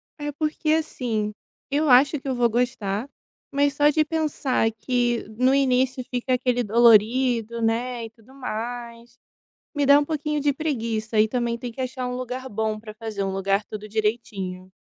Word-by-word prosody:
É 295 Hz, -1 st, -4 dB
porque 305 Hz, +1 st, -2 dB
assim, 230 Hz, -9 st, -1 dB, 0.4 s
eu 295 Hz, +1 st, +1 dB
acho 275 Hz, +4 st, +5 dB
que 275 Hz, -, -10 dB
eu 260 Hz, -, 0 dB
vou 240 Hz, -1 st, +3 dB
gostar, 235 Hz, -1 st, -1 dB, 0.4 s
mas 285 Hz, 0 st, +2 dB
só 295 Hz, 0 st, +5 dB
de 310 Hz, +1 st, +3 dB
pensar 295 Hz, -7 st, 0 dB
que 240 Hz, +1 st, 0 dB
no 255 Hz, +2 st, +4 dB
início 260 Hz, -1 st, +2 dB
fica 250 Hz, +1 st, -1 dB
aquele 250 Hz, -1 st, +1 dB
dolorido, 235 Hz, +1 st, +4 dB
né, 235 Hz, +1 st, -1 dB
e -, -, -8 dB
tudo 230 Hz, +3 st, -21 dB
mais, 240 Hz, -1 st, -6 dB, 0.6 s
me 290 Hz, -1 st, +1 dB
dá 285 Hz, +1 st, +7 dB
um 290 Hz, -, -1 dB
pouquinho 300 Hz, -1 st, -2 dB
de 290 Hz, 0 st, +3 dB
preguiça 230 Hz, -7 st, -2 dB
e 220 Hz, -, +5 dB
também 235 Hz, 0 st, -1 dB
tem 240 Hz, 0 st, -6 dB
que 260 Hz, -, -6 dB
achar 255 Hz, 0 st, -3 dB
um 250 Hz, -, -3 dB
lugar 255 Hz, +1 st, -5 dB
bom 215 Hz, 0 st, -2 dB
para 215 Hz, -1 st, -10 dB
fazer, 215 Hz, -3 st, -4 dB
um 195 Hz, -, -1 dB
lugar 195 Hz, +1 st, +1 dB
tudo 215 Hz, 0 st, -8 dB
direitinho. 200 Hz, -4 st, -3 dB
245 Hz, 175 wpm, -24 LUFS, 220-270 Hz, 0.6 s, dá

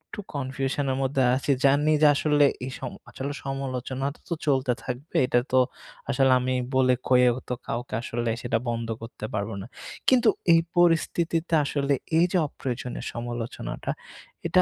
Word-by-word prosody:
একটু -, -, -8 dB, 0.2 s
কনফিউশন 135 Hz, +1 st, -2 dB
এর 130 Hz, -, -1 dB
মধ্যে 135 Hz, 0 st, +1 dB
আছি। 135 Hz, +2 st, 0 dB
জানি 145 Hz, +3 st, +4 dB
যে 150 Hz, -, +8 dB
আসলে 145 Hz, 0 st, +4 dB, 0.2 s
এ -, -, -5 dB
সম -, -, -5 dB, 0.2 s
আসলে 140 Hz, +2 st, -5 dB
সমালোচনাটা 135 Hz, +1 st, -3 dB
তো -, -, -1 dB
চলতে 130 Hz, -3 st, +2 dB
থাকবে। 130 Hz, +6 st, -6 dB
এটা 120 Hz, -1 st, +3 dB
তো 130 Hz, -, +5 dB, 0.5 s
আসলে 135 Hz, -1 st, +3 dB
আমি 130 Hz, +1 st, -1 dB, 0.2 s
বলে 130 Hz, -1 st, +4 dB, 0.2 s
কয়ে 125 Hz, -1 st, +6 dB, 0.2 s
তো -, -, 0 dB
কাউকে 120 Hz, +2 st, -4 dB
আসলে 120 Hz, 0 st, -2 dB
সেটা 120 Hz, -2 st, 0 dB
বন্ধ 115 Hz, -1 st, -2 dB
করতে 115 Hz, -1 st, -7 dB
পারব 100 Hz, +1 st, -1 dB
না। 100 Hz, -, -8 dB, 0.4 s
কিন্তু 245 Hz, -4 st, +5 dB, 0.2 s
এই 165 Hz, -, +7 dB, 0.2 s
পরিস্থিতিতে 170 Hz, 0 st, +2 dB
আসলে 140 Hz, 0 st, 0 dB, 0.2 s
এই 170 Hz, -, +6 dB
যে 185 Hz, -, +2 dB
অপ্রয়োজনীয় 125 Hz, -3 st, -5 dB
সমালোচনাটা, 120 Hz, 0 st, -4 dB, 0.6 s
এটা -, -, +5 dB
130 Hz, 155 wpm, -26 LUFS, 125-145 Hz, 0.6 s, যে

